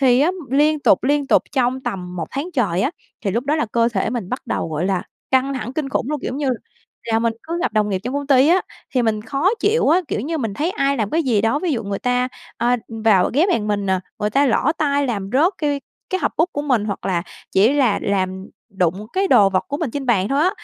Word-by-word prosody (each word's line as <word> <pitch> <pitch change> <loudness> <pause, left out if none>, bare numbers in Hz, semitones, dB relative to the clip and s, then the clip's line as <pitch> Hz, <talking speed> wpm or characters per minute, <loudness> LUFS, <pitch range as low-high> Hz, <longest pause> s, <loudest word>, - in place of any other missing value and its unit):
Thì 255 -2 +4
á 310 +5 +4 0.2
liên 300 +2 +3
tục, - - +4
liên 285 +1 +1
tục - - +4
trong 260 -1 +1
tầm 180 -6 -5
1 170 - -3
tháng 280 +5 -3
trời 195 - +1
á, 265 - +1 0.3
thì 195 - +1
lúc 235 +6 -1
đó 290 +2 +1
là 305 - 0
cơ 230 0 +3
thể 220 -2 -1
mình 230 -6 -3
bắt 255 - -4
đầu, - - -2
gọi 155 +3 -2
là, 190 -2 0 0.3
căng 265 +1 +2
thẳng 250 -2 -4
kinh 285 -1 -2
khủng 270 - -1
luôn. 300 -2 -2
Kiểu, - - -3
giống - - -4
như 285 -3 0 0.5
là, 225 -1 0
mình 230 0 +1
cứ 335 +2 -4
gặp - - 0
đồng 210 -1 +2
nghiệp 195 -2 0
trong 250 +3 -3
công 285 0 -2
ty 275 0 +5
á, 360 +3 +5 0.3
thì 250 - +3
mình 215 -2 0
khó 275 - +1
chịu 440 +2 +2
á, 340 +4 +5
kiểu - - -1
như 315 +7 -3
mình 225 -7 -3
thấy 310 - -1
ai 275 -5 0
làm 215 -3 -1
cái 330 - +1
gì 235 -8 +2
đó, 225 +6 +1
ví 335 0 -1
dụ 235 -4 -1
người 200 0 -3
ta, 250 0 0 0.3
ờ, 240 +1 +2 0.3
vào 195 -5 +4
ghé 320 +7 +4
bàn 220 - 0
mình 205 -1 -1
nè, 190 -1 +2 0.2
người 210 0 -1
ta 275 +6 +3
lỡ 260 +5 +2
tay 285 -2 +1
làm 200 -5 -3
rớt 320 +9 +4
cai 290 -2 0 0.3
cái 375 - 0
hộp - - +1
bút 325 +3 +3
của 290 - -2
mình 250 -8 +1
hoặc 200 -2 -4
là 180 -3 0 0.3
chỉ 210 +7 +4
là 265 -7 +2
làm 190 -1 -1 0.3
đụng 185 +4 0
cái 385 +1 +1
đồ 200 - +6
vật 185 -1 0
của 285 - -2
mình 305 -6 -2
trên 280 0 -4
bàn 205 -5 +2
thôi 275 +3 +1
á, 365 - +4
250 Hz, 270 wpm, -20 LUFS, 210-285 Hz, 0.5 s, đồ